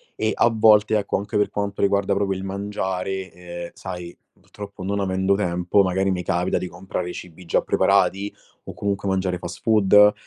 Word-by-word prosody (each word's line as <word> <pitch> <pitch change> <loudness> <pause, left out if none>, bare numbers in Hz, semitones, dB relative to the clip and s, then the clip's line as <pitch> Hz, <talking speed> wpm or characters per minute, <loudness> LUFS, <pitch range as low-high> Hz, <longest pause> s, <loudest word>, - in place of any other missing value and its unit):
e 110 - 0
a - - +4
volte 110 -1 +5
ecco, 100 - -1
anche 100 +1 -6
per 105 - +2
quanto 100 -1 -3
riguarda 100 0 +2
proprio 100 -1 0
il 95 - -6
mangiare, 95 -1 -3
ehm, 85 0 -8
sai, 90 -2 -7 0.2
purtroppo 100 -2 -10
non 100 +2 -1
avendo 95 0 +1
tempo 90 0 +2
magari 95 +1 +1
mi 90 -1 -2
capita 85 +1 0
di 90 - -3
comprare 90 0 -5
cibi 90 0 -10
già 85 - +1
preparati 100 +2 +2 0.3
o - - -7
comunque 100 -1 -2
mangiare 95 -1 0
fast 85 0 -7
food, 105 -1 +5
95 Hz, 175 wpm, -23 LUFS, 90-100 Hz, 0.3 s, volte